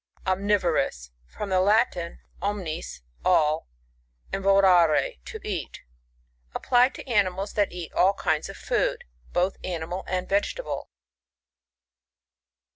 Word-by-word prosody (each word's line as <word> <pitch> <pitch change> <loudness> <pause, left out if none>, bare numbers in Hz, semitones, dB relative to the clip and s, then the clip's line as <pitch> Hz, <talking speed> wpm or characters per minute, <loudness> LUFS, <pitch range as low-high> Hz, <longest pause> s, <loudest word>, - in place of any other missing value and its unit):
Omnivorous. 185 - 0
— - - -37
From 210 - -3
the 185 -1 +3
Latin, 200 -4 +1 0.2
omttM, 185 - -4 0.2
all, 155 - +3 0.7
and 195 - -2
vorare 195 - +4
to 440 - -7
eat 180 -7 -4 0.7
Applied 250 +1 +3
to - - -9
animals 200 -4 +1
that 205 -1 +1
eat 175 -2 -7
all 190 +2 +4
kinds 155 -5 -1
of - - -9
food, - - 0 0.3
both 180 +2 +1
animal 175 +1 -4
and 185 0 -2
vegetable. 205 - -2
185 Hz, 115 wpm, -26 LUFS, 170-205 Hz, 0.7 s, vorare